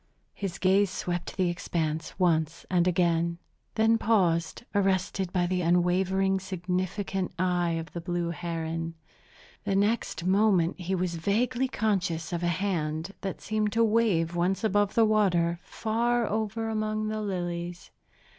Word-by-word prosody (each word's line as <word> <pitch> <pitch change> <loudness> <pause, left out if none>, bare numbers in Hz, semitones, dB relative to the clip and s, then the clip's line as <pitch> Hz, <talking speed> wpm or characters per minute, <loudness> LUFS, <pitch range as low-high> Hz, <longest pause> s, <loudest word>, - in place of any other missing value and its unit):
His 195 -2 -4
gaze 195 +1 +3
swept 175 -1 -4
the 185 -2 +2
expanse 160 -3 -3
once 165 -3 +1
and 180 -1 +3
again, 170 -1 +2 0.4
then 225 +1 +3
paused, 180 -3 +1
arrested 190 -2 +1
by 180 -2 +1
the 180 +1 0
unwavering, 185 +3 +2
significant 185 +1 -2
eye 175 -1 +1
of 165 -1 -5
the 170 - -4
blue 175 -1 -2
heron. 165 -1 -4 0.7
The 195 -2 0
next 200 -4 0
moment 190 -3 +3
he 185 +1 -1
was 180 -2 -1
vaguely 240 +9 +1
conscious 185 -9 -1
of 170 - -1
a 175 - 0
hand, 170 -1 -1
that 195 -1 -4
seemed 215 -1 -1
to 230 0 +3
wave 210 -7 +2
once 180 +5 0
above 205 -1 +2
the 230 - +5
water, 175 -6 +2
far 235 +2 0
over 220 +1 -2
among 215 -1 -1
the 215 0 -2
lilies. 175 -3 -4
185 Hz, 140 wpm, -28 LUFS, 170-205 Hz, 0.7 s, the